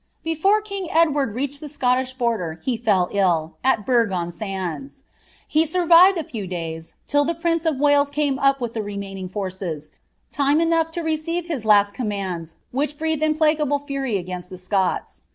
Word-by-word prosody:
Before 355 +7 +2
king 400 -3 -5
Edward 295 -9 +2
rwiched 280 +2 -2
the 300 - -7
Scottish 260 -2 0
bonier 215 - -1
he 255 - 0
fell 205 -6 +2
ill, 170 -5 +1
m 260 -5 +2
Barfi 235 -3 +2
on 175 -1 -2
Sands. 195 - -5 0.4
He 310 +1 +3
gurrived 350 +3 +6
a 330 - -1
firvr 210 -9 -6
days, 165 -2 -6
till 290 0 +2
the 335 +3 -1
prince 335 0 0
or 320 - +3
Wales 285 0 +3
ramr 285 -2 0
up 275 0 +3
with 240 -2 -4
the 225 - -2
remaining 200 -2 -6
forces, 185 -6 -5 0.4
time 285 +2 +2
enough 330 -1 +2
to - - 0
recfire 320 +2 -2
his 295 -10 -4
tasl 205 -1 +5
comnnftK 190 -8 -4 0.2
which 290 +3 -1
breathed 320 -1 -1
implacable 305 -2 +2
fury 275 -6 -2
against 180 -1 -6
the 185 - -8
Scots. 185 +1 -1
260 Hz, 170 wpm, -22 LUFS, 195-310 Hz, 0.4 s, gurrived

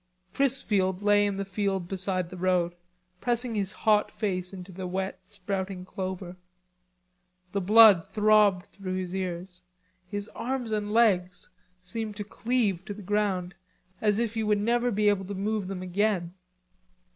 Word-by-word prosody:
Chrisfield 205 -8 +1
lay 205 0 +4
in 200 - -2
the 195 0 -3
field 195 -2 -2
beside 185 -2 -1
the - - -7
road, 180 -1 +1 0.5
pressing 240 +1 +1
his 200 -3 -1
hot 210 +1 +2
face 185 -4 -3
into 185 -1 -9
the 185 0 -6
wet 190 +1 -4
sprouting 190 -2 -4
clover. 185 -1 -5 1.1
The 200 - -1
blood 210 -2 +7
throbbed 210 -4 +4
through 185 -2 -6
his 185 -1 -4
ears. 180 0 -4 0.5
His 205 +2 -4
arms 250 -2 -3
and 210 -1 -1
legs 185 -6 +2 0.3
seemed 215 +3 -5
to 205 - -4
cleave 210 -4 -1
to 205 - -6
the 210 - -10
ground, 195 -2 0 0.5
as 210 -1 +2
if 230 -1 0
he 225 - -1
would 210 -1 +2
never 240 +3 +1
be 210 -2 +1
able 200 -2 +2
to 200 +2 -5
move 205 0 -1
them 185 -1 -5
again. 185 -2 0
195 Hz, 155 wpm, -27 LUFS, 185-215 Hz, 1.1 s, blood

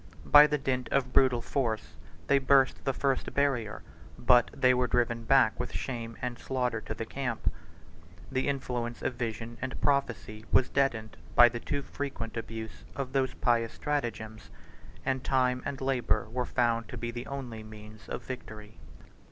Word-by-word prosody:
By 150 0 +9
the 150 0 0
dint 130 -2 -2
of 130 -2 0
brutal 125 -3 +4
force, 115 -6 -2 0.3
they 140 0 +4
burst 135 0 +3
the 135 - +2
first 135 0 -1
barrier; 135 -7 0 0.3
but 125 -2 +5
they 130 -2 +3
were 125 0 +2
driven 120 -1 0
back 130 -3 +4
with - - -3
shame 115 -3 -4
and 125 -1 -3
slaughter 125 -4 -1
to 110 - -6
the 115 - -4
camp: 125 -1 -2 0.8
the 130 0 0
influence 125 -4 -3
of - - 0
vision 115 -1 -5
and 130 0 -4
prophecy 125 -6 0
was 125 - +4
deadened 115 - 0 0.2
by 120 0 +9
the 120 0 -5
too 140 +3 -3
frequent 130 -5 -5
abuse 115 -1 -6
of 135 -1 -4
those 130 -2 +1
pious 115 -2 +1
stratagems; 115 -7 -3 0.6
and 130 -1 0
time 125 -1 +2
and 135 - -4
labor 130 -4 0
were 125 +1 -1
found 115 -1 +1
to - - -6
be 120 0 -3
the 120 +1 -6
only 125 -5 -6
means 110 0 -12
of - - -4
victory. 110 -4 -8
125 Hz, 165 wpm, -29 LUFS, 115-135 Hz, 0.8 s, By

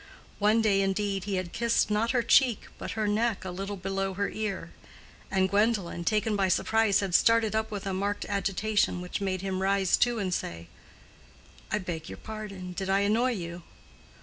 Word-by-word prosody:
One 215 +2 +3
day, 200 -2 +3
indeed, 195 0 -1
he 200 -2 -1
had 185 -2 -3
kissed 230 -2 +1
not 215 +2 +1
her 245 -2 +2
cheek 240 -1 +4 0.2
but - - -5
her 215 -1 +1
neck 215 -1 0
a 185 - -4
little 195 +3 -4
below 195 0 -2
her 200 +1 -1
ear; 215 -3 -4 0.6
and 190 -1 +2
Gwendolen, 200 -4 0
taken 215 +1 +1
by 195 -2 +2
surprise, 220 +2 +2
had 195 -3 -3
started 225 +2 +4
up 220 0 0
with 205 -3 -5
a 195 - -2
marked 200 +2 -2
agitation 200 0 0
which 180 +2 -5
made 190 -2 -1
him 190 -1 -2
rise 195 -1 +3
too 240 -1 +2
and 190 -4 -1
say, 85 - -4 1.0
"I - - +2
beg 170 -5 -5
your - - -7
pardon—did 195 -3 -6
I 195 +1 +3
annoy 230 +5 +2
you?" 170 -4 -6
200 Hz, 180 wpm, -28 LUFS, 190-215 Hz, 1.0 s, cheek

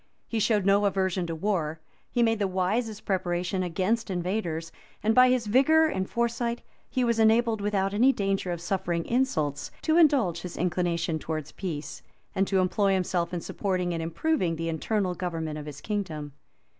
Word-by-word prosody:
He 225 - -2
showed 210 -2 +2
no 200 +1 +4
aversion 190 -2 0
to 165 - -3
war; 160 -4 -1 0.3
he 240 - +2
made 225 -1 +2
the 200 - +1
wisest 205 +4 -1
preparations 185 0 -1
against 190 +6 -1
invaders; 175 -3 -2 0.3
and, 220 +1 +3
by 255 +2 +7
this 250 -2 +2
vigor 275 +9 +5
and 190 -8 -2
foresight, 235 0 -1 0.3
he 255 - 0
was 235 -1 +1
enabled 225 0 +3
without 200 -1 0
any 245 +6 +5
danger 195 -5 -1
of 170 -1 -4
suffering 175 -2 -1
insults, 155 - 0
to 315 +1 +3
indulge 260 - +4
his 180 0 -7
inclination 170 -2 0
towards 155 -1 -4
peace, 160 -6 -5 0.3
and 195 0 +1
to 190 -1 +2
employ 195 +2 +2
himself 180 -2 0
in 175 -1 -3
supporting 180 -2 -2
and 165 - -2
improving 170 - 0
the 165 +1 -3
internal 185 +3 -1
government 165 -3 -4
of 150 - -8
his 145 -2 -8
kingdom. 160 -9 -4
190 Hz, 170 wpm, -27 LUFS, 170-220 Hz, 0.3 s, by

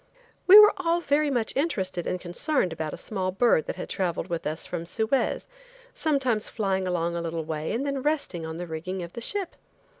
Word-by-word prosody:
We 390 +2 +11
were 425 0 +9
all 340 -2 +1
very 300 -2 +1
much 240 -5 -1
interested 190 - -1
and 180 - -2
concerned 180 - 0
about 155 -1 -4
a - - -7
small 190 -3 -3
bird 195 -4 +2
that - - -3
had - - -6
traveled 175 -1 -2
with 170 -3 -3
us 155 +2 -3
from 170 -1 -5
Suez, 225 +7 0 0.5
sometimes 260 -8 0
flying 190 -3 -1
along 170 -1 -1
a 170 - -2
little 165 -1 -3
way 155 0 -3
and 255 +5 -1
then 275 -1 -2
resting 285 - -1
on 160 0 -5
the 175 - -5
rigging 175 +3 -5
of 170 - -9
the 235 - -7
ship. 390 - -2
190 Hz, 205 wpm, -26 LUFS, 170-275 Hz, 0.5 s, We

